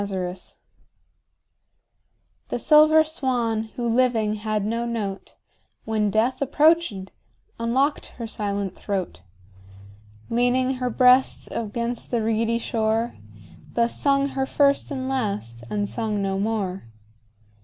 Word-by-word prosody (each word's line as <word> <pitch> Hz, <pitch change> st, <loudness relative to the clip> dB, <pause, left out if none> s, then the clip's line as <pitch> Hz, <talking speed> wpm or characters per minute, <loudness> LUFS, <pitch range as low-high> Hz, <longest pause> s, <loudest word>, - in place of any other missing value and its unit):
6 200 Hz, -, -4 dB
Autoplay 185 Hz, -1 st, -4 dB, 1.9 s
The -, -, -2 dB
silver 310 Hz, +1 st, +6 dB
swan, 245 Hz, -8 st, -1 dB
who 240 Hz, -1 st, -2 dB
living 230 Hz, -3 st, +2 dB
had 215 Hz, -1 st, -2 dB
no 230 Hz, +2 st, -1 dB
note, 215 Hz, -5 st, -4 dB, 0.5 s
When 215 Hz, -2 st, 0 dB
death 225 Hz, +7 st, +1 dB
approach'd, 290 Hz, -, +2 dB, 0.5 s
unlock'd 260 Hz, +6 st, 0 dB
her 235 Hz, -, -4 dB
silent 200 Hz, -3 st, -3 dB
throat; 190 Hz, -, -4 dB, 1.1 s
Leaning 250 Hz, +2 st, +1 dB
her 250 Hz, -1 st, -1 dB
breast 250 Hz, +2 st, +4 dB
against 235 Hz, +2 st, -3 dB
the 235 Hz, -3 st, 0 dB
reedy 225 Hz, +1 st, +1 dB
shore, 225 Hz, 0 st, -1 dB, 0.6 s
Thus 235 Hz, 0 st, 0 dB
sung 275 Hz, 0 st, +2 dB
her 265 Hz, -1 st, -2 dB
first 280 Hz, 0 st, +2 dB
and 260 Hz, -3 st, -4 dB
last, 200 Hz, -, -3 dB
and 205 Hz, -1 st, -1 dB
sung 220 Hz, -2 st, -2 dB
no 195 Hz, 0 st, -1 dB
more. 200 Hz, -, -2 dB
230 Hz, 115 wpm, -24 LUFS, 210-255 Hz, 1.9 s, silver